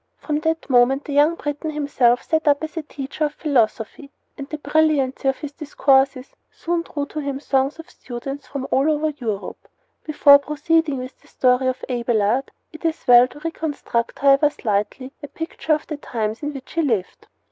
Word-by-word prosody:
From 300 -1 -2
that 320 +1 -2
moment 265 +2 +3
the 290 - -5
young 295 +4 +4
Breton 295 0 -4
himself 280 -5 +1
set 320 -1 -1
up 285 +1 +3
as 315 - -5
a 325 - -2
teacher 290 +1 -4
of 300 0 -4
philosophy, 250 -1 -1 0.3
and 280 0 -8
the 305 - -4
brilliancy 290 -3 +1
of 270 - +1
his 295 -2 -7
discourses 275 -3 +1
soon 345 0 -2
drew 290 -3 -4
to 305 - -6
him 280 -2 -3
throngs 270 0 0
of 325 - -11
students 270 +3 -8
from 275 -1 -5
all 275 +4 +3
over 310 0 +1
Europe. 230 -9 -6 0.4
Before 290 -2 +6
proceeding 300 +1 0
with 255 0 -8
the - - -23
story 255 0 +2
of 255 0 -2
Abelard 240 0 0 0.2
it 315 - -12
is 325 -1 -2
well 245 0 +7
to 295 +4 -14
reconstruct, 300 -7 -3
however 280 +1 +4
slightly, 225 +1 -2
a 290 - -7
picture 320 +2 -3
of 300 - -7
the 300 - -5
times 220 -5 -4
in 295 0 -3
which 270 -1 -9
he 330 - +1
lived. 225 - -2
280 Hz, 185 wpm, -21 LUFS, 255-305 Hz, 0.4 s, well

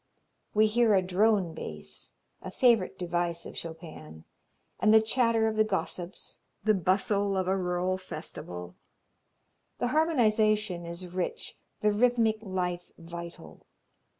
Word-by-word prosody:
We 215 +1 +6
hear 220 0 +4
a 190 - +4
drone 190 -1 +2
bass 75 - -8 0.3
a 185 - -6
favorite 220 -2 +3
device 175 -1 -2
of - - -9
Chopin 155 - -9 0.6
and 215 - +4
the 220 - +8
chatter 225 0 +2
of 220 -1 -2
the 215 - +6
gossips, 190 -3 -4 0.2
the 215 +1 +4
bustle 195 +2 +1
of 185 -1 0
a 190 - +2
rural 180 0 -1
festival. 90 - -8 1.0
The 245 - 0
harmonization 215 - +2
is 170 +2 -6
rich, 185 -1 -3 0.3
the 210 - +3
rhythmic 225 0 +2
life 180 -3 -3
vital. 170 - -10
190 Hz, 125 wpm, -29 LUFS, 170-215 Hz, 1.0 s, the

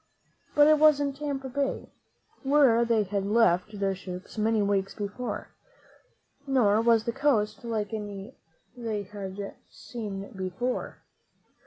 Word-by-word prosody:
But 290 - +7
it 310 -1 +5
wasn't 290 -2 +4
Tampa 280 -2 -3
Bay, 275 +1 -2 0.5
where 270 -4 +4
they 230 -2 +2
had 200 0 -2
left 205 -1 +2
their 195 -1 +1
ships 185 -1 -8
many 220 0 +1
weeks 195 -1 0
before, 205 +4 -4 1.0
nor 225 -6 +3
was 230 -1 +4
the 235 - -1
coast 230 -7 +1
like 225 -2 -2
any 205 +1 -6 0.4
they 225 -4 -3
had 195 -1 -7
ever 200 - -5 0.2
seen 205 -5 -7
before. 190 +7 -3
220 Hz, 130 wpm, -28 LUFS, 200-255 Hz, 1.0 s, But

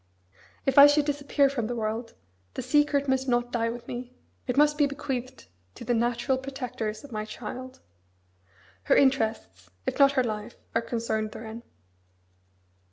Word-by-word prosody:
If 270 +1 +5
I 285 - +12
should 290 0 +3
disappear 285 -1 +2
from 255 -5 -2
the 245 - -3
world, 225 +1 -3 0.4
the - - -3
secret 285 +1 +2
must 265 0 +1
not 240 -1 +1
die 230 -2 0
with 235 +1 -7
me. 245 0 -6 0.4
It 250 - -1
must 295 +1 +5
be 290 - +5
bequeathed 265 -2 -5 0.3
to - - -9
the 240 - +1
natural 240 +3 +1
protectors 250 -5 -5
of 285 - -12
my 215 -1 -3
child. 255 +4 -8 1.0
Her - - +4
interests, 220 - +1 0.2
if - - -3
not 275 0 +6
her 260 -2 +2
life, 215 0 -4 0.2
are 230 - +2
concerned 225 -2 -2
therein. 225 +1 -8
245 Hz, 160 wpm, -27 LUFS, 230-275 Hz, 1.0 s, I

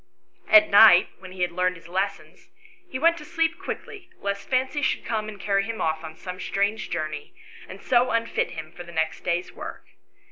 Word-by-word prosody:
At 315 0 +8
night, 200 -3 +8
when 185 -1 -11
he 185 -1 -2
had 175 - 0
learned 180 +1 0
his 165 -1 -14
lessons, 190 +3 -4 0.4
he 290 - -4
went 335 +4 +3
to - - -10
sleep 330 +1 -1
quickly 400 -5 -7
lest 200 0 -4
Fancy 260 +3 0
should 265 - 0
come 215 -2 -2
and 205 -2 -10
carry 195 0 +1
him 225 +2 -5
off 160 0 -1
on 160 0 -8
some 180 +2 -8
strange 205 +3 -1
journey, 155 -3 -4 0.3
and 190 - -10
so 250 0 +3
unfit 230 0 0
him 160 -2 -8
for 175 - -11
the 170 - -12
next 160 -1 -2
day's 175 0 -1
work. - - -9
200 Hz, 200 wpm, -25 LUFS, 175-250 Hz, 0.4 s, At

